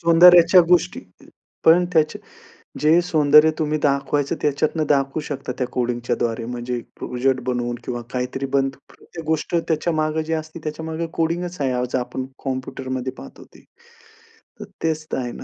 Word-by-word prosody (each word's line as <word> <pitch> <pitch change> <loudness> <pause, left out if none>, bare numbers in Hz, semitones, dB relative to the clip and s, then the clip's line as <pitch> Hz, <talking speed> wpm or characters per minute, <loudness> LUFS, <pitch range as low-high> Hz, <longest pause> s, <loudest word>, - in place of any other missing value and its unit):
सौंदर्याच्या 170 +1 +7
अ, 170 - +2
गोष्टी 175 - +2 0.6
पण 170 +2 +6
त्याचे, 155 -2 +2 0.6
जे 160 +3 +4
सौंदर्य 150 -3 +5
तुम्ही 155 -1 0
दाखवायचं 140 0 +1
त्याच्यातनं 150 +2 0
दाखवू 140 0 +1
शकता 140 -3 -5
त्या 125 - -1
कोडिंगच्यद्वारे. 120 -1 -2
म्हणजे 120 0 -4 0.2
प्रोजेक्ट 130 +1 0
बनवून 120 -1 -1
किंवा 120 -1 -4
काहीतरी 125 +2 -2
बनतं. 135 0 +1
प्रत्येक 165 -2 -12
गोष्ट 160 +2 -1
त्याच्या 165 0 0
मागे 155 0 0
जी 160 +1 -3
असते 155 +1 -5
त्याच्यामागे 160 +2 -4
कोडिंगच 175 +2 -2
आहे. 135 -2 +1
आज 125 0 -2
आपण 130 +1 -3 0.2
कॉम्प्युटरमध्ये 130 -1 -4
पाहतो - - -12
ते. - - -18 1.0
तर 210 - -7 0.2
तेच 160 -1 -1
तर - - -1
आहे 125 -2 -3
ना. - - -9
150 Hz, 150 wpm, -21 LUFS, 130-160 Hz, 1.0 s, सौंदर्याच्या